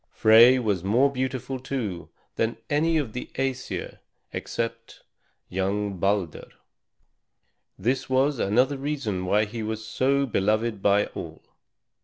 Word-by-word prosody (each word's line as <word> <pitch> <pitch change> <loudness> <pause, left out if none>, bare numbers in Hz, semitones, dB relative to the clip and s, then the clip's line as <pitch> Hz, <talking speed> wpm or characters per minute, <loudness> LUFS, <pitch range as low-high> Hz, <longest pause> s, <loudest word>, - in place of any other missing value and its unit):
Frey 115 +4 +6
was 105 -8 -1
more 120 +8 +3
beautiful, 130 0 -3
too, 120 -9 -4 0.3
than 115 +1 -1
any 160 +3 +2
of 135 -8 -2
the 125 - -6
Æsir 135 -1 -3 0.3
except 115 0 -5 0.4
young 100 +1 -2
Balder. 95 -3 -1 1.3
This 130 +3 -1
was 135 +1 +2
another 125 +8 +2
reason 130 -11 -3
why 105 +3 +3
he 110 +2 -6
was 110 0 -4
so 140 +4 +1
beloved 110 -1 0
by 100 +1 +3
all. - - -9
115 Hz, 120 wpm, -25 LUFS, 105-130 Hz, 1.3 s, Frey